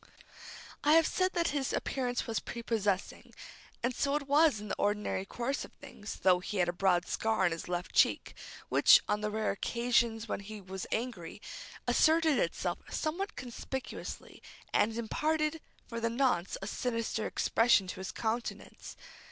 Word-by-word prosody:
I 295 Hz, -, +5 dB
have 325 Hz, 0 st, +6 dB
said 370 Hz, 0 st, +1 dB
that 340 Hz, -1 st, +1 dB
his 280 Hz, -3 st, -1 dB
appearance 250 Hz, -2 st, -1 dB
was 225 Hz, -2 st, -1 dB
prepossessing, 215 Hz, -5 st, -2 dB, 0.5 s
and 245 Hz, +2 st, +1 dB
so 280 Hz, +3 st, 0 dB
it 290 Hz, -2 st, -2 dB
was 290 Hz, -4 st, +4 dB
in 210 Hz, -, -7 dB
the -, -, -1 dB
ordinary 205 Hz, -2 st, 0 dB
course 245 Hz, +7 st, -2 dB
of -, -, -11 dB
things, 220 Hz, -7 st, -9 dB
though 185 Hz, -1 st, +5 dB
he 200 Hz, +3 st, -5 dB
had 180 Hz, -2 st, +3 dB
a 175 Hz, -, 0 dB
broad 180 Hz, -1 st, +2 dB
scar 220 Hz, -3 st, +1 dB
on 175 Hz, -, +3 dB
his 165 Hz, -, -5 dB
left 175 Hz, 0 st, -3 dB
cheek, -, -, +3 dB, 0.3 s
which, -, -, +7 dB
on 210 Hz, 0 st, 0 dB
the 210 Hz, -, -1 dB
rare 215 Hz, 0 st, 0 dB
occasions 235 Hz, +1 st, +1 dB
when -, -, -2 dB
he 210 Hz, +2 st, -8 dB
was 190 Hz, -1 st, -7 dB
angry, 220 Hz, -8 st, -3 dB, 0.5 s
asserted 320 Hz, -2 st, +4 dB
itself -, -, -1 dB
somewhat 375 Hz, +7 st, -2 dB
conspicuously, 255 Hz, +1 st, -6 dB, 0.3 s
and 220 Hz, +2 st, +2 dB
imparted, 305 Hz, +7 st, 0 dB, 0.3 s
for 230 Hz, -1 st, -4 dB
the 230 Hz, 0 st, 0 dB
nonce, 235 Hz, -8 st, +1 dB
a -, -, -3 dB
sinister 230 Hz, 0 st, -2 dB
expression 225 Hz, -4 st, +3 dB
to 185 Hz, -, -6 dB
his 190 Hz, -, -4 dB
countenance. 230 Hz, +1 st, -4 dB
230 Hz, 160 wpm, -32 LUFS, 205-275 Hz, 0.5 s, which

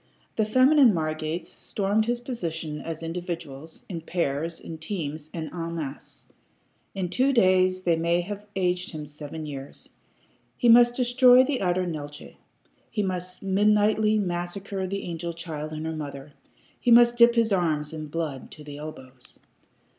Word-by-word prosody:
The 220 Hz, -, +2 dB
feminine 255 Hz, +2 st, +5 dB
Margates 155 Hz, +1 st, -2 dB
stormed 205 Hz, +2 st, -1 dB
his 240 Hz, 0 st, 0 dB
position 165 Hz, -, -4 dB
as 165 Hz, 0 st, -6 dB
individuals, 165 Hz, -3 st, -6 dB
in 170 Hz, -4 st, -5 dB
pairs, 165 Hz, -1 st, -2 dB
in 160 Hz, -1 st, -8 dB
teams, 155 Hz, -4 st, -5 dB
and 160 Hz, -2 st, -6 dB
en 170 Hz, -1 st, -4 dB
masse. 150 Hz, -4 st, -7 dB, 0.7 s
In 190 Hz, -2 st, -1 dB
two 260 Hz, +9 st, +2 dB
days 185 Hz, -5 st, +3 dB
they 170 Hz, -2 st, +3 dB
may 170 Hz, +2 st, +1 dB
have 205 Hz, +3 st, -7 dB
aged 180 Hz, -1 st, 0 dB
him 155 Hz, -1 st, -5 dB
seven 150 Hz, +1 st, -7 dB
years. 140 Hz, -2 st, -9 dB, 0.6 s
He 240 Hz, -, +3 dB
must 240 Hz, +1 st, +7 dB
destroy 250 Hz, 0 st, +6 dB
the 260 Hz, -1 st, -1 dB
utter 180 Hz, 0 st, +1 dB
Neeltje. 145 Hz, -3 st, -7 dB, 0.5 s
He 210 Hz, -2 st, -1 dB
must 185 Hz, -1 st, -4 dB
midnightly 210 Hz, +2 st, +3 dB
massacre 190 Hz, +1 st, -3 dB
the 195 Hz, +1 st, -3 dB
angel 170 Hz, 0 st, -4 dB
child 155 Hz, -2 st, -6 dB
and 155 Hz, 0 st, -5 dB
her 160 Hz, 0 st, -3 dB
mother. 145 Hz, -1 st, -7 dB, 0.5 s
He -, -, 0 dB
must 240 Hz, 0 st, +7 dB
dip 235 Hz, 0 st, +6 dB
his 230 Hz, -3 st, +3 dB
arms 155 Hz, -5 st, 0 dB
in 155 Hz, -1 st, -6 dB
blood 150 Hz, -4 st, -4 dB
to 150 Hz, -, -12 dB
the 145 Hz, -1 st, -9 dB
elbows. 130 Hz, -4 st, -9 dB
175 Hz, 155 wpm, -26 LUFS, 155-210 Hz, 0.7 s, must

